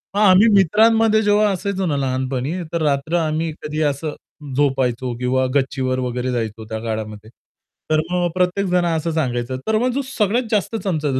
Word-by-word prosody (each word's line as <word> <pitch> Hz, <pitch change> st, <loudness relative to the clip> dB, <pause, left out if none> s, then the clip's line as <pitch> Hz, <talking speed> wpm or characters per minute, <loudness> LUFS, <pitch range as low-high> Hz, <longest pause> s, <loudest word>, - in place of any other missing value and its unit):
मग -, -, +1 dB
आम्ही 200 Hz, +2 st, +6 dB
मित्रांमध्ये 220 Hz, +4 st, +4 dB
जेव्हा 205 Hz, 0 st, +3 dB
असायचो 195 Hz, 0 st, -2 dB
ना 145 Hz, -4 st, 0 dB
लहानपणी 130 Hz, +2 st, -2 dB, 0.2 s
तर 170 Hz, -, -1 dB
रात्र 145 Hz, +2 st, 0 dB
आम्ही 160 Hz, 0 st, -1 dB
कधी 150 Hz, +1 st, -3 dB
असं 150 Hz, +2 st, -5 dB, 0.4 s
झोपायचो 130 Hz, -3 st, 0 dB
किंवा 130 Hz, +1 st, +1 dB
गच्चीवर 130 Hz, -1 st, 0 dB
वगैरे 125 Hz, 0 st, -2 dB
जायचो 110 Hz, -2 st, -3 dB
त्या 110 Hz, 0 st, -4 dB
काळामध्ये. 110 Hz, -1 st, -5 dB, 0.6 s
तर 155 Hz, 0 st, +3 dB
मग 175 Hz, -1 st, +1 dB
प्रत्येक 185 Hz, +2 st, +1 dB
जण 180 Hz, -1 st, +2 dB
असं 165 Hz, 0 st, -1 dB
सांगायचं 130 Hz, -4 st, -2 dB
तर 220 Hz, 0 st, +2 dB
मग 250 Hz, +2 st, +1 dB
जो 280 Hz, -, 0 dB
सगळ्यात 235 Hz, -1 st, 0 dB
जास्त 215 Hz, +2 st, 0 dB
चमकायचा 150 Hz, -8 st, -1 dB
155 Hz, 165 wpm, -20 LUFS, 130-190 Hz, 0.6 s, आम्ही